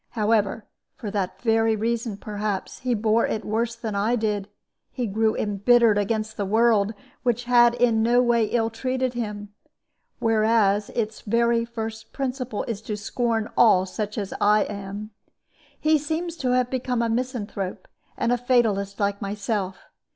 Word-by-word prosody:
However, 215 -1 +1 0.3
for 215 -5 -6
that 195 -3 -2
very 225 -1 +3
reason, 225 -1 -2
perhaps, 205 -2 -4
he 250 -1 0
bore 220 +1 +2
it 215 - -3
worse 230 +2 -1
than 230 -2 -5
I 210 +4 +1
did. 210 -3 -1 0.4
He 250 - -3
grew 220 +1 +1
imbittered 210 +2 +3
against 215 +1 -2
the 200 - -1
world, 220 -1 +3 0.3
which 240 -1 0
had 240 -1 +5
in 235 -2 +3
no 240 +2 +4
way 240 -2 +3
ill 225 +1 0
treated 255 +2 -1
him; 210 -3 -4 0.7
whereas 215 -2 +2
its 220 -2 -2
very 235 +1 +2
first 220 -1 -6
principle 255 -4 -3
is 225 -3 -4
to 215 -1 -4
scorn 225 +1 -1
all 190 -6 +5
such 210 +3 -4
as 200 -3 -3
I 210 +1 +5
am. 205 +1 -6 0.7
He 310 0 +3
seems 320 +3 -3
to 255 -4 0
have 250 -1 +1
become 250 -2 -1
a - - +1
misanthrope, 225 -6 -3 0.3
and 235 - 0
a 245 - +2
fatalist 220 -6 +1
like 200 0 0
myself. 200 -1 -3
225 Hz, 155 wpm, -24 LUFS, 210-240 Hz, 0.7 s, had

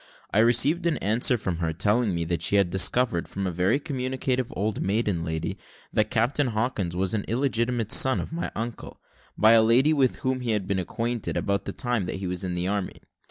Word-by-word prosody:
I 105 - +3
received 130 +10 +3
an 165 - 0
answer 115 +4 +2
from 95 -6 -3
her, 80 -1 -2
telling 105 +3 +1
me 85 - -1
that 85 0 -2
she 95 - +1
had 100 -3 +3
discovered, 95 0 +2
from 100 0 -4
a 90 - -1
very 90 +9 +1
communicative 130 -3 -2
old 105 +1 -2
maiden 100 -4 0
lady, 80 -1 -4 0.3
that 110 0 +1
Captain 125 +4 +1
Hawkins 110 -6 -2
was 95 +2 0
an 105 -2 -1
illegitimate 120 -2 -1
son 130 0 +5
of - - -6
my 170 - -3
uncle, 115 +1 -6 0.4
by 110 +1 +5
a 115 -1 +7
lady 125 +7 +4
with 135 -4 +2
whom 130 0 0
he 120 -3 -1
had 105 -3 -1
been 100 0 -1
acquainted, 115 +5 -3
about 100 -1 -1
the - - -3
time 120 -2 -2
that - - -3
he 95 0 -5
was 90 0 -2
in 90 -1 -3
the 90 +1 -1
army. 100 -1 -3
110 Hz, 210 wpm, -25 LUFS, 95-125 Hz, 0.4 s, a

